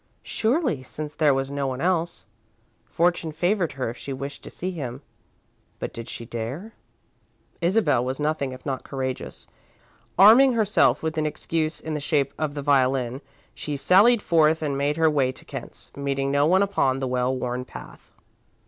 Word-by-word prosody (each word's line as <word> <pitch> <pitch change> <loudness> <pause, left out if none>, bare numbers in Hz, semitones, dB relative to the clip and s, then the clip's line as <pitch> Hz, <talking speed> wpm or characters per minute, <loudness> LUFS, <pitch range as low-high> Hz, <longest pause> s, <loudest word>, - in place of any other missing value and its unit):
Surely, 240 - 0
since 150 +3 -7
there 150 -2 +3
was 135 0 -1
no 140 -1 -1
one 130 -1 -3
else. 170 0 -1 0.6
Fortune 170 -1 0
favoured 175 +2 0
her 130 -4 -3
if 120 - -12
she 140 - -7
wished 140 +1 -6
to - - -10
see 185 +2 -4
him. 135 -5 -6 0.7
But - - -5
did 115 0 -8
she 115 - -7
dare? 130 - -6 0.9
Isabel 175 - +2
was 130 +2 -3
nothing 150 -3 -1
if 130 0 -10
not 135 -3 -3
courageous. 130 -2 -5 0.7
Arming 240 +7 +8
herself 215 -6 +3
with 160 0 -1
an 155 - +1
excuse 155 +1 -2
in 160 - -5
the 150 - -2
shape 140 -2 0
of 155 -2 -2
the 145 - -4
violin, 130 -2 +2 0.3
she 145 -1 -4
sallied 205 - +5
forth 160 -1 +3
and 145 -2 -1
made 145 +2 0
her 160 -1 +4
way 140 -4 +2
to - - -14
Kent's, - - -9
meeting 140 -1 -1
no 140 +1 +3
one 190 +4 +4
upon 135 -10 +1
the 135 -1 -2
well 125 +1 0
worn 125 0 -3
path. - - -13
145 Hz, 175 wpm, -24 LUFS, 130-170 Hz, 0.9 s, Arming